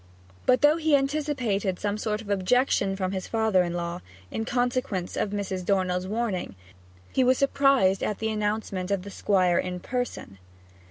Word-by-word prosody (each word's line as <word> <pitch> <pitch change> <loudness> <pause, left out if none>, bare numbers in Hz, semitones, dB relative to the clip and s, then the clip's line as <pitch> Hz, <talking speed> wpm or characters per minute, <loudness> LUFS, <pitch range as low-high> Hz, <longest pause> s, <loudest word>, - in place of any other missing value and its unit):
But 255 0 +4
though 300 +2 +5
he 315 -2 +3
anticipated 270 -9 0
some 205 0 -1
sort 215 0 -2
of 210 - -11
objection 200 0 +2
from 190 -1 -2
his 190 -2 -4
father 220 -4 +2
in 175 -1 -2
law, 175 +1 -3 0.3
in 225 - -3
consequence 245 -7 -1
of - - -1
Mrs. 195 -2 -3
Dornell's 185 -1 0
warning, 210 - -2 0.6
he 260 - +3
was 255 0 +4
surprised 275 -8 +3
at 210 - -1
the 220 0 -2
announcement 210 -3 -2
of 200 -2 0
the 200 - -8
Squire 185 -4 +2
in 180 -1 -3
person. 245 - -4
205 Hz, 165 wpm, -26 LUFS, 185-245 Hz, 0.6 s, though